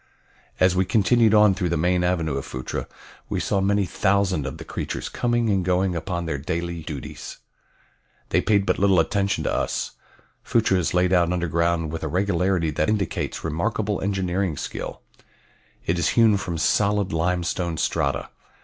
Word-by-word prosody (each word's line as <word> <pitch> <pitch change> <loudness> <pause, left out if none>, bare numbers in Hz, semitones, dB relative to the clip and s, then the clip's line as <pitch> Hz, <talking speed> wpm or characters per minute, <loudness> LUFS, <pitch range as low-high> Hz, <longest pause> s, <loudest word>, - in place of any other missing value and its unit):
As 90 0 +4
we 95 - +3
continued 110 +3 +3
on 105 -2 +6
through 90 -2 -1
the 85 - 0
main 90 +2 +1
avenue 85 -5 0
of 70 - -3
Phutra 65 0 -5 0.4
we - - -1
saw 100 - 0
many 100 +1 +2
thousand 95 -3 +1
of 65 - -6
the - - -9
creatures - - -4
coming 120 -2 0
and 95 -2 +1
going 90 0 +1
upon 85 +1 -3
their 75 -4 -2
daily 85 +2 -3
duties. 75 -3 -7 0.9
They - - +2
paid 100 -2 +2
but - - +1
little 95 -2 +4
attention 100 +4 0
to - - -1
us. - - -1 0.5
Phutra 105 -5 +2
is 90 - -1
laid 90 +1 +3
out 85 -1 +3
underground 85 -2 0
with 80 - -5
a - - -2
regularity 90 -3 +1
that 75 +3 0
indicates 105 -5 -2
remarkable 105 +5 -1
engineering 95 -3 -1
skill. - - -6 0.8
It 85 +1 0
is 85 - +1
hewn 115 -3 +6
from 85 -4 -4
solid 100 +5 +1
limestone 85 0 -1
strata. - - -1
90 Hz, 165 wpm, -24 LUFS, 85-100 Hz, 0.9 s, on